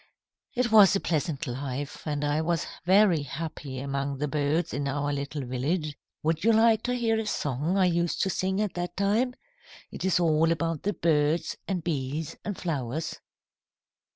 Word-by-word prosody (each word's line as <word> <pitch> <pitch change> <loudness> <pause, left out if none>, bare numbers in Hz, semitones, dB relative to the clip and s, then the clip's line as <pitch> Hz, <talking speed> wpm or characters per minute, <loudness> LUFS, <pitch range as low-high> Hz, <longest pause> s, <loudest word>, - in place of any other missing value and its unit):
"It 245 -2 +1
was 205 -3 +8
a - - +2
pleasant 160 -2 -1
life, 135 +3 -5
and 145 -1 -1
I 145 +2 +1
was 170 0 0 0.2
very 190 -3 +5
happy 145 -1 -6
among 140 +1 -2
the 150 +2 -1
birds 150 +3 0
in 140 +1 -1
our 145 +1 -1
little 140 0 -4
village. 145 +5 -1 0.3
Would 160 +1 0
you 230 - +5
like 225 0 +5
to 250 0 0
hear 225 -2 +1
a 220 - -3
song 150 +1 -1
I 190 - +4
used 170 -1 +1
to 190 - 0
sing 190 +2 -1
at 210 -3 -1
that 175 0 -4
time? 220 +6 +1 0.6
It - - -7
is 185 -1 +2
all 165 -1 +3
about 165 -1 -1
the 205 - -1
birds 155 -1 +1
and 185 -4 -2
bees 150 -1 -2
and 205 -2 -4
flowers." 150 -3 -3
160 Hz, 175 wpm, -27 LUFS, 145-190 Hz, 0.6 s, was